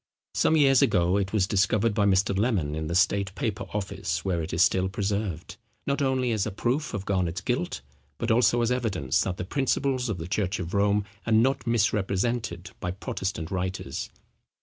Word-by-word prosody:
Some 160 - +3
years 135 -3 +5
ago 90 0 +3
it 100 -1 -1
was 105 -4 +2
discovered 100 +3 +2
by 100 -1 +2
Mr. 100 0 +2
Lemon 100 -8 0
in 80 0 -3
the 85 - -2
State 95 +2 +2
Paper 100 -2 -2
Office, 105 -1 -3
where 90 -3 0
it 80 - -5
is 85 +2 +4
still 95 0 +2
preserved, 100 -3 -3 0.3
not 140 +1 0
only 130 -2 +1
as 110 -2 0
a - - -3
proof 125 +9 -1
of 100 -1 -4
Garnet's 95 -2 -1
guilt, 120 -5 -2 0.4
but 115 - -1
also 120 +1 +4
as 120 - +1
evidence, 105 - 0
that 95 -1 -2
the 90 - -4
principles 130 +1 0
of 105 - -2
the 80 0 -6
church 100 +1 -1
of 85 -2 -5
Rome 100 0 +2 0.2
are - - 0
not 125 +3 +2
misrepresented 100 -3 0
by 90 - -3
Protestant 90 -2 -4
writers. 95 0 -3
100 Hz, 185 wpm, -26 LUFS, 95-115 Hz, 0.4 s, years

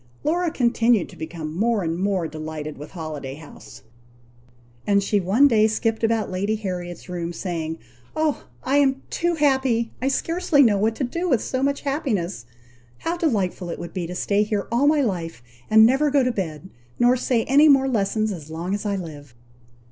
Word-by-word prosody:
Laura 345 +3 +1
continued 235 - +2
to - - -13
become 160 -1 -6
more 220 +1 +1
and 165 0 -1
more 190 -3 0
delighted 155 -1 -6
with 150 - -10
Holiday 150 -6 -6
House; 155 0 -13 1.0
and 200 -1 +3
she 205 +1 +1
one 205 +10 +4
day 220 -4 +4
skipped 225 +1 -1
about 225 -3 +1
Lady 200 +4 -1
Harriet's 180 -4 -5
room, 175 -2 -4
saying, 165 -2 -4 0.4
"Oh! 310 -2 0 0.2
I 270 +2 +2
am 270 -1 +2
too 345 0 0
happy! 265 -6 +1
I 260 - 0
scarcely 330 +1 +2
know 210 -5 +3
what 220 +2 +1
to 275 - -3
do 340 +8 -2
with 250 -7 +2
so 260 - -2
much 280 +1 0
happiness. 215 - -2 0.5
How 335 - -2
delightful 200 - -1
it - - -4
would 170 - -8
be 180 -3 -3
to 180 - -6
stay 200 +2 +1
here 210 -1 -1
all 250 +5 +3
my 300 -1 +4
life, 170 - -3 0.3
and 220 0 +7
never 270 +6 +3
to - - 0
go 280 -2 +4
to 250 - +1
bed, 180 -5 -5 0.3
nor 245 +1 +4
say 245 -2 0
any 290 +4 +5
more 270 -1 +5
lessons 215 -2 0
as 160 -6 -8
long 170 +4 -4
as 205 +1 -2
I 200 - 0
live!" 145 -8 -8
215 Hz, 190 wpm, -23 LUFS, 175-265 Hz, 1.0 s, and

